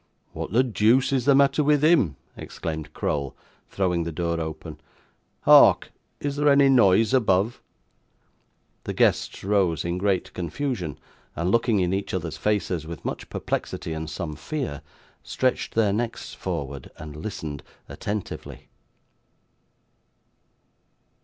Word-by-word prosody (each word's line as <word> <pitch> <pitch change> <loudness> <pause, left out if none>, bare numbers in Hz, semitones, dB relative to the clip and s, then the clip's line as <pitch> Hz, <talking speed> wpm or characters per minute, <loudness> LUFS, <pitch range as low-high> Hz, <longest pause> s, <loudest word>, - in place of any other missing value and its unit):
'What - - -5
the 120 +5 +4
deuce 125 +3 +2
is 130 -3 +1
the 140 - +5
matter 140 +2 +4
with 150 0 +3
him?' 150 - +4 0.2
exclaimed 80 -2 -6
Crowl, 70 -2 -2 0.3
throwing 90 -3 0
the 85 - -4
door 85 +1 -2
open. 80 0 -7 0.6
'Hark! - - +6 0.3
Is 145 -1 -3
there 145 0 +3
any 140 -1 +5
noise 115 -2 +4
above?' 110 -2 +2 1.2
The - - -3
guests - - +1
rose 95 -6 +1
in 85 +1 -2
great 95 -2 0
confusion, 90 - -3 0.4
and, 85 +3 -1
looking 115 -3 +2
in 90 0 0
each 95 -1 -2
other's 85 -3 -3
faces 95 -6 -1
with 85 -1 -8
much - - -5
perplexity 80 - -3
and 80 0 -5
some 75 0 -5
fear, 130 - -4 0.4
stretched 130 -1 -1
their 105 -3 +3
necks 115 +2 -3
forward, 70 -1 -5
and 75 -1 -9
listened 75 -4 -6 0.3
attentively. 105 -1 -6
95 Hz, 125 wpm, -25 LUFS, 80-120 Hz, 1.2 s, Hark